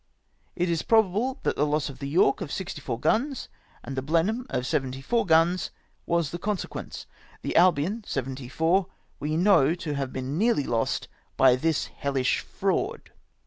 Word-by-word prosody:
It 180 0 0
is 170 -2 0
probable 225 +4 +2
that - - 0
the - - +1
loss 150 0 0
of 135 -3 -9
the 140 -1 -4
York 145 -1 +3
of 160 -6 -5
64 150 -10 -4
guns, 265 - 0 0.3
and 135 - -6
the 130 - -1
Blenheim 170 - 0
of" 125 - -2
74 135 - -1
guns, 165 +2 +3 0.4
was 170 -3 +1
the 175 - -5
consequence. 205 0 -4 0.4
The - - -3
Albion, 185 +5 +3
74, 140 +8 0 0.3
we 155 +2 -1
know 170 -5 +4
to 165 -4 -4
have 135 -2 -3
been 130 +4 -3
nearly 225 -9 +3
lost 115 -3 -1 0.3
by 130 -2 +6
this 155 +4 0
hellish 135 -2 -1
fraud." - - -2
160 Hz, 155 wpm, -26 LUFS, 135-190 Hz, 0.4 s, by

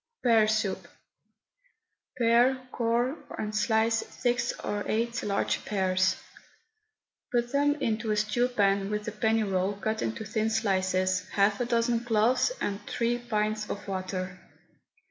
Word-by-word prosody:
PEAR 225 -3 +5
SOUP. 215 -2 -1 1.3
Pare, 240 +2 +4
core, 240 +4 0 0.2
and 215 0 -3
slice 220 +1 +2
six 245 -1 0
or 205 0 -2
eight 235 +2 -1
large 200 -1 -1
pears. 185 -2 +1 1.2
Put 240 0 0
them 290 +1 +2
into 225 -5 -2
a 210 - +2
stew 215 +4 +1
pan 200 -4 +1
with 210 0 -3
a - - -1
penny 220 +1 +1
roll 190 0 0
cut 220 +2 -3
into 115 - -3
thin 215 +1 0
slices, 185 -3 0
half 200 +2 +2
a - - +1
dozen 235 0 +1
cloves, 240 - +2
and 200 0 -2
three 240 +1 0
pints 215 -2 -1
of 205 - -5
water. 185 -1 -4
215 Hz, 135 wpm, -28 LUFS, 200-235 Hz, 1.3 s, PEAR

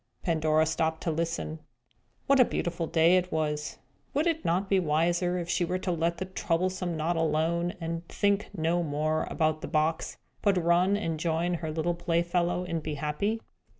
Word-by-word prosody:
Pandora 155 -2 +2
stopped 160 0 -1
to 165 - 0
listen. 165 0 -2 0.7
What 275 0 +4
a - - +9
beautiful 170 -4 -2
day 165 +3 +4
it 180 0 -1
was! 150 -1 -2 0.4
Would 295 +3 +2
it 325 -2 0
not 185 +4 +1
be 195 0 +3
wiser 175 +2 +1
if 170 -1 -3
she 175 - +1
were 180 +2 -1
to 185 0 -2
let 170 0 0
the 185 - -3
troublesome 180 -1 -1
knot 165 +3 0
alone, 165 +3 +1
and 165 0 -4
think 200 0 +1
no 165 +2 +1
more 155 0 -1
about 155 -1 0
the - - -5
box, 160 +1 0 0.2
but 200 -3 +3
run 180 +3 +3
and 165 -6 -2
join 170 +2 0
her 165 -2 -3
little 165 +2 0
playfellow 175 +1 0
and 165 -2 -3
be 155 -1 -4
happy? 155 +10 -1
170 Hz, 180 wpm, -28 LUFS, 160-180 Hz, 0.7 s, a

